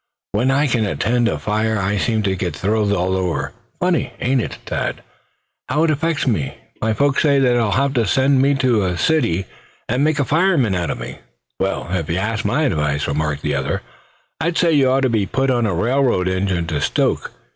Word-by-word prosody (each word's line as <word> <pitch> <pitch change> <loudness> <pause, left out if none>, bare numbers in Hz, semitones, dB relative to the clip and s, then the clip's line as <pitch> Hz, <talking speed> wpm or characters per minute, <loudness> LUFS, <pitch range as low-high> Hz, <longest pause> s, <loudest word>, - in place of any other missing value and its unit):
When 115 +6 +1
I 140 +2 +3
can 120 -5 +1
attend 120 +4 +1
a - - 0
fire 110 +1 -1
I 100 +1 0
seem 110 +1 0
to 95 -1 0
thrill 105 +1 0
all 90 +1 0
over. 90 -3 -2 0.3
Funny, 180 -2 0
ain't 130 0 +1
it, - - -5
Thad, - - -3 0.7
how 155 - +2
it 165 - +3
affects 155 0 0
me? 95 - -1 0.2
My 110 - +1
folks 140 +4 +2
say 145 -3 +3
they'll 120 -4 +2
have 135 +5 +1
to 115 -5 +1
send 135 +1 +3
me 140 +1 +3
to 130 -5 +2
the 90 -2 -1
city, 95 - +1 0.4
and 125 +5 0
make 155 0 +2
a 140 - +1
fireman 155 - +2
out 90 -2 -1
of - - -2
me." - - -7 0.4
"Well, 95 0 -1
if 85 -4 -1
they 85 - -1
asked 105 +3 -2
my 145 +10 +1
advice," 75 - 0
remarked 75 0 -2
the 75 - 0
other, 70 0 -2 0.6
"I'd 165 +1 -1
say 170 -2 +3
you 140 -4 +4
ought 135 +1 +2
to 130 - +2
be 110 -4 0
put 135 0 0
on 120 -3 +1
a 95 - -1
railroad 120 -2 +1
engine 95 -2 0
to 80 -3 -2
stoke. - - 0
115 Hz, 205 wpm, -19 LUFS, 95-135 Hz, 0.7 s, you